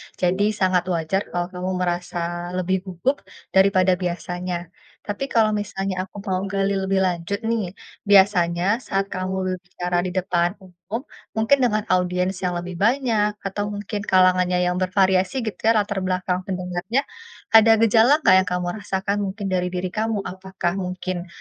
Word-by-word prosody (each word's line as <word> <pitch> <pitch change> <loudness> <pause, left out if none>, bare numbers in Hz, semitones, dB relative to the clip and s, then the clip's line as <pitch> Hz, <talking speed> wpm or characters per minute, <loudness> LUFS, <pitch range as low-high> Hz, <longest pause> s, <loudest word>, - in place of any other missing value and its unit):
jadi 185 +3 +1
sangat 185 -2 +1
wajar 180 +2 -1
kalau 175 +1 -3
kamu 180 0 -3
merasa 175 -1 -3
lebih 185 +1 0
gugup 190 +9 -2 0.3
daripada 190 -1 +4
biasanya, 175 -1 -4 0.3
tapi 205 +7 -4
kalau 220 -4 +3
misalnya 195 -2 -3
aku - - -41
mau 190 -3 -1
gali 195 0 0
lebih 190 0 +1
lanjut 185 +4 -2
nih, 220 -5 -1 0.3
biasanya 190 0 +4
saat 195 0 -1
kamu 185 0 -3 0.2
berbicara 180 -1 -3
di - - -4
depan 175 -1 +1
umum 180 -2 -17 0.6
mungkin 220 +6 +4
dengan 215 -4 +2
audiens 180 +1 +1
yang 180 -1 -1
lebih 175 +1 -5
banyak 225 -2 +2
atau 205 +1 -2
mungkin 205 +1 -4
kalangannya 185 -1 +4
yang 180 0 +1
bervariasi 185 +1 +2
gitu 210 -5 -5
ya 225 - +5
latar 205 -2 0
belakang 185 -1 -1
pendengarnya, 185 +6 -2 0.5
ada 225 0 +8
gejala 225 +3 +5
enggak 185 - +7
yang 190 - -1
kamu 180 0 -1
rasakan 200 0 -2
mungkin 200 +2 -5
dari 180 -1 +1
diri 180 0 -2
kamu? 215 -1 -1
Apakah 185 -1 -3
mungkin, 185 -1 -4
185 Hz, 150 wpm, -22 LUFS, 180-205 Hz, 0.6 s, ada